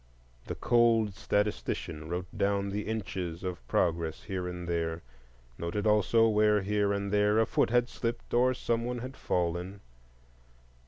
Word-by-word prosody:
The -, -, -3 dB
cold 115 Hz, -3 st, +3 dB
statistician 90 Hz, -6 st, -2 dB
wrote 90 Hz, +1 st, -4 dB
down 100 Hz, 0 st, +1 dB
the 105 Hz, +1 st, -3 dB
inches 95 Hz, -6 st, -4 dB
of 90 Hz, -10 st, -5 dB
progress 80 Hz, -2 st, 0 dB
here 95 Hz, -3 st, -3 dB
and 90 Hz, -1 st, -6 dB
there, 85 Hz, -1 st, -2 dB, 0.6 s
noted 95 Hz, +5 st, -2 dB
also 105 Hz, +2 st, +4 dB
where 105 Hz, -2 st, +3 dB
here 105 Hz, 0 st, +1 dB
and 100 Hz, 0 st, -2 dB
there 105 Hz, +1 st, +3 dB
a 115 Hz, -, +4 dB
foot -, -, +1 dB
had 120 Hz, +1 st, +3 dB
slipped 115 Hz, -1 st, -4 dB
or 125 Hz, +2 st, +4 dB
some 115 Hz, -1 st, -1 dB
one 125 Hz, +1 st, -2 dB
had 130 Hz, +3 st, -6 dB
fallen. 90 Hz, +1 st, -2 dB
100 Hz, 150 wpm, -30 LUFS, 90-110 Hz, 0.6 s, also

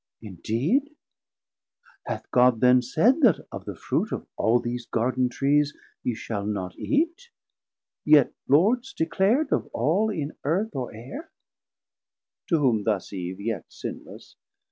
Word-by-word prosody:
Indeed? 130 Hz, -, -1 dB, 1.1 s
hath -, -, -5 dB
God 125 Hz, -2 st, +4 dB
then 125 Hz, +1 st, +5 dB
said 220 Hz, -, +2 dB
that 235 Hz, -, +4 dB
of -, -, -7 dB
the -, -, -6 dB
Fruit -, -, -2 dB
Of -, -, -4 dB
all 115 Hz, +2 st, +3 dB
these 120 Hz, 0 st, -4 dB
Garden 125 Hz, +2 st, 0 dB
Trees 145 Hz, +3 st, +1 dB, 0.3 s
ye 120 Hz, -, -2 dB
shall 105 Hz, -2 st, -4 dB
not 100 Hz, -3 st, -3 dB
eate, 335 Hz, +10 st, -1 dB, 0.7 s
Yet 150 Hz, -3 st, +5 dB
Lords 215 Hz, -, +3 dB
declar'd 210 Hz, -, +1 dB
of -, -, 0 dB
all 175 Hz, -, +1 dB
in 155 Hz, -8 st, -4 dB
Earth 175 Hz, +6 st, -1 dB
or 130 Hz, -2 st, -3 dB
Aire? 125 Hz, -, -9 dB, 1.2 s
To 165 Hz, -, +3 dB
whom 125 Hz, -8 st, +2 dB
thus 105 Hz, -2 st, -1 dB
Eve 90 Hz, 0 st, -5 dB
yet 105 Hz, -4 st, -3 dB
sinless. -, -, -9 dB
135 Hz, 135 wpm, -25 LUFS, -, 1.2 s, then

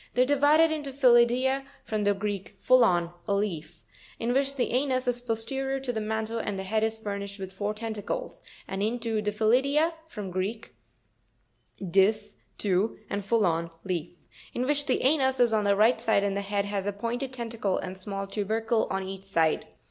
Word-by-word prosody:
They 250 Hz, -, +5 dB
are -, -, +1 dB
divided 290 Hz, +4 st, +4 dB
into 295 Hz, -3 st, -3 dB
PHyLirpra 255 Hz, 0 st, +4 dB, 0.2 s
(from 215 Hz, -2 st, -2 dB
the 205 Hz, 0 st, +3 dB
Greek, 200 Hz, -1 st, -4 dB
phullon, 180 Hz, -9 st, +4 dB
a 200 Hz, -, +2 dB
leaf), 170 Hz, -5 st, -3 dB, 0.3 s
in 235 Hz, +1 st, -1 dB
which 275 Hz, +1 st, +1 dB
the 255 Hz, -, 0 dB
anus 255 Hz, 0 st, +1 dB
is 245 Hz, 0 st, 0 dB
posterior 265 Hz, +4 st, -2 dB
to 260 Hz, -2 st, -3 dB
the 220 Hz, -, -2 dB
mantle, 220 Hz, +1 st, -2 dB
and 205 Hz, -3 st, -3 dB
the 190 Hz, -, -4 dB
head 215 Hz, +3 st, 0 dB
is 220 Hz, 0 st, 0 dB
furnished 200 Hz, -2 st, -5 dB
with 190 Hz, 0 st, -6 dB
four 205 Hz, +2 st, -2 dB
tentacles; 225 Hz, -, -5 dB, 0.3 s
and 195 Hz, 0 st, -4 dB
into 225 Hz, 0 st, -1 dB
Drenytuipra 255 Hz, +10 st, +2 dB
(from 210 Hz, -10 st, -6 dB
the -, -, -10 dB
Greek, 200 Hz, +5 st, -3 dB, 1.1 s
dis, 205 Hz, +3 st, +2 dB, 0.2 s
two, 200 Hz, +2 st, 0 dB
and 200 Hz, -, -1 dB
phullon, 180 Hz, -6 st, +1 dB
leaf), 175 Hz, -3 st, -3 dB, 0.4 s
in 250 Hz, -, 0 dB
which 290 Hz, +1 st, +1 dB
the 260 Hz, -, +1 dB
anus 265 Hz, -1 st, +3 dB
is 240 Hz, -2 st, +4 dB
on 210 Hz, -1 st, +2 dB
the 200 Hz, 0 st, +4 dB
right 220 Hz, +3 st, +4 dB
side, 220 Hz, -4 st, +3 dB
and 200 Hz, -1 st, 0 dB
the 200 Hz, -, -1 dB
head 200 Hz, 0 st, -1 dB
has 200 Hz, -1 st, -3 dB
a -, -, +1 dB
pointed 235 Hz, +5 st, -3 dB
tentacle, 230 Hz, -6 st, -2 dB
and 185 Hz, 0 st, -5 dB
small 195 Hz, +1 st, -4 dB
tubercle 220 Hz, +3 st, 0 dB
on 190 Hz, 0 st, -2 dB
each 195 Hz, 0 st, -7 dB
side. 165 Hz, -5 st, +1 dB
220 Hz, 185 wpm, -27 LUFS, 200-250 Hz, 1.1 s, They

